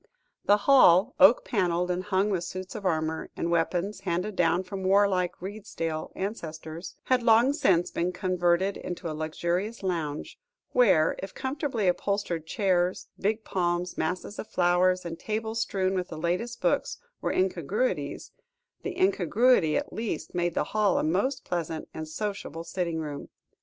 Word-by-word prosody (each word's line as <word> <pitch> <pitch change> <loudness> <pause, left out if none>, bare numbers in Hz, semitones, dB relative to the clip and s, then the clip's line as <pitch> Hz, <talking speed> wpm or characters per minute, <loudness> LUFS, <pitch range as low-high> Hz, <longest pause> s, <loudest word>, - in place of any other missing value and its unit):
The 205 - +5
hall, 235 -5 +6
oak 195 +6 +7
panelled, 180 -4 0
and 180 +1 -2
hung 200 +1 +1
with 180 -3 0
suits 185 +1 -6
of 200 - -3
armour, 160 -1 -1
and 170 - -1
weapons 175 +4 0
handed 190 +2 -2
down 175 +1 +2
from 190 +1 -6
war 200 +2 +5
like 180 -2 -1
Redesdale 185 -5 -5
ancestors, 165 -4 -6
had 255 -1 +2
long 235 +3 +5
since 190 - +2
been 175 +2 -1
converted 180 0 +1
into 175 -2 -5
a - - -4
luxurious 175 +8 -2
lounge, 160 -5 -3 0.3
where, 190 -11 +4
if 195 - -7
comfortably 265 -6 -2
upholstered 180 -3 -1
chairs, 185 -3 0
big 215 +2 0
palms, 175 -2 -1
masses 180 +5 -3
of - - -5
flowers, 180 +1 +2
and 165 -1 -5
tables 220 +1 -2
strewn 190 -3 0
with 180 -1 -1
the 160 - -8
latest 180 +9 -2
books, - - +1 0.2
were - - 0
incongruities, 485 +6 -1 0.5
the 385 -2 -5
incongruity 250 - +3
at - - -4
least 215 -8 -4
made 175 -1 -1
the - - +2
hall 210 -3 +3
a - - +1
most 200 - 0
pleasant 165 -2 -3
and 155 0 -6
sociable 165 -2 -4
sitting 170 -2 -2
room. 150 -3 -5
185 Hz, 155 wpm, -27 LUFS, 170-210 Hz, 0.5 s, oak